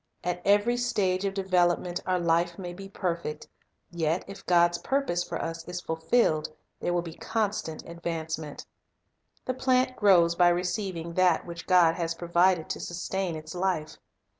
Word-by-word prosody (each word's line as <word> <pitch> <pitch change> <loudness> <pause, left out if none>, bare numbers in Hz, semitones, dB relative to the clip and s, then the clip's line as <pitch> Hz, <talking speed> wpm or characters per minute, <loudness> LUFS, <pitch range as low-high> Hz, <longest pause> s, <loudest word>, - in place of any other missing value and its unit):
At 180 0 -2
every 205 +4 +3
stage 200 -6 0
of 195 0 -2
development 180 -1 +1
our 185 0 +2
life 170 0 +1
may 180 -2 -6
be 195 +2 -9
perfect; 170 -6 -3 0.4
yet 165 0 -1
if 195 0 -10
God's 175 -1 +4
purpose 270 -11 0
for - - -5
us 165 0 -4
is 180 0 -4
fulfilled, 160 -1 +1 0.3
there - - -1
will 175 -1 0
be 165 -2 -7
constant 205 -6 -3
advance 165 -1 -4
ment. 150 -2 -8 0.8
The 255 - -1
plant 255 0 +1
grows 180 -6 +5
by 175 +1 +4
receiving 175 -1 -2
that 180 -2 +3
which 170 -1 -8
God 175 -3 +5
has 165 -1 -2
provided 175 0 +2
to - - -4
sustain 180 0 -3
its 155 0 -8
life. 175 -4 -2
175 Hz, 160 wpm, -28 LUFS, 170-190 Hz, 0.8 s, grows